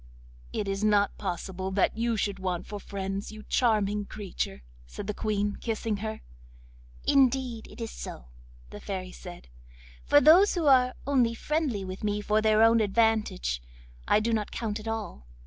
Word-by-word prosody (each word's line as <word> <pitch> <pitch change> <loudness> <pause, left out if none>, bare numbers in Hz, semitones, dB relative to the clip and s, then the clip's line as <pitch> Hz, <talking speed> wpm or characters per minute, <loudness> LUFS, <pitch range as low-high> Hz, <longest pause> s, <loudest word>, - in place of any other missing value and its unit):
'It 205 - -3
is 195 +1 -2
not 205 -1 +3
possible 190 0 -4
that 190 0 +1
you 230 0 0
should 200 -1 -1
want 185 -2 -2
for 205 - -6
friends, 195 +1 -5
you 215 0 -10
charming 210 -4 +1
creature,' 195 - -5 0.2
said - - -7
the 210 - -2
Queen, 205 -1 -1
kissing 225 -2 -2
her. 220 +1 -5 0.8
'Indeed 260 -4 +2
it - - -13
is 230 -1 -4
so,' - - -8 0.4
the - - -8
Fairy 185 -2 -5
said. 175 -1 -11 0.6
'For 290 - +6
those 345 +8 +6
who 340 -3 -1
are 255 -2 +5
only 250 -5 +2
friendly 275 -8 -1
with 185 +2 -7
me 210 0 0
for 210 +1 +1
their 215 0 +4
own 230 0 +6
advantage, 210 - +1 0.5
I - - +4
do 230 +2 0
not 215 -2 -1
count 220 -2 -3
at 215 - -9
all. 220 - -5
215 Hz, 165 wpm, -28 LUFS, 195-230 Hz, 0.8 s, For